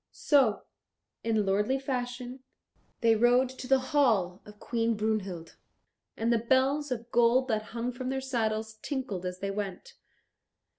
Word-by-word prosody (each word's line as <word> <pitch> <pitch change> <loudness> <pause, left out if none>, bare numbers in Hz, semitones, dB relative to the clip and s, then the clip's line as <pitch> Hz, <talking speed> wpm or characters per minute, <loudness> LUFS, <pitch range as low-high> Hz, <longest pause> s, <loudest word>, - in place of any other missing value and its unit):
So, 265 -8 +3 0.6
in 220 -2 +1
lordly 210 +7 +1
fashion, 250 -1 -4 0.6
they 230 -1 +5
rode 245 +3 +4
to 260 0 -8
the 270 +1 +5 0.2
hall 210 -10 +2
of 210 0 -13
Queen 230 -1 0
Brunhild, 195 -6 -3 0.6
and 230 +1 +1
the 230 - +2
bells 265 +5 +2
of 235 -1 -4
gold 240 +2 +4
that 215 -2 +1 0.2
hung 240 +2 -1
from 255 +1 -5
their 265 0 -1
saddles 220 -4 -2
tinkled 250 -11 -3
as 180 0 -6
they 195 0 -2
went. 195 -2 -5
235 Hz, 145 wpm, -29 LUFS, 215-260 Hz, 0.6 s, they